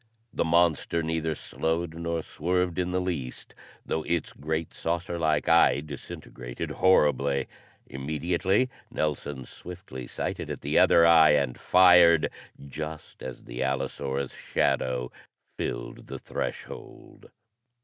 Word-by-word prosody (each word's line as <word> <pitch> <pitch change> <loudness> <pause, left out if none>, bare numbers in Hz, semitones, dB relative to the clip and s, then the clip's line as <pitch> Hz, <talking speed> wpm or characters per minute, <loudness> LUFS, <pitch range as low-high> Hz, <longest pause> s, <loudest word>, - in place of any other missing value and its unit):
The - - +1
monster 85 0 +2
neither 80 0 -1
slowed 80 +2 -2
nor 85 -1 -3
swerved 90 +1 -1
in 90 0 0
the 90 0 0
least, 85 -9 -4 0.3
though 80 - -1
its 85 +1 -2
great, 80 +2 -3
saucer 85 +1 -3
like 80 -2 +1
eye 85 -3 +5
disintegrated 65 -4 -7
horribly. 70 -6 +3 0.4
Immediately 85 - 0 0.2
Nelson 75 -3 -3
swiftly 85 -9 -9
sighted - - -4
at - - -5
the - - +2
other 85 - +6
eye 80 -2 +7
and 70 -4 +1
fired, 90 -3 +6 0.4
just 75 +3 -7
as 65 - -7
the - - -6
allosaurus' 65 0 -2
shadow 60 -1 -1 0.4
filled - - -5
the - - -6
threshold. - - -7
80 Hz, 120 wpm, -27 LUFS, 70-85 Hz, 0.4 s, eye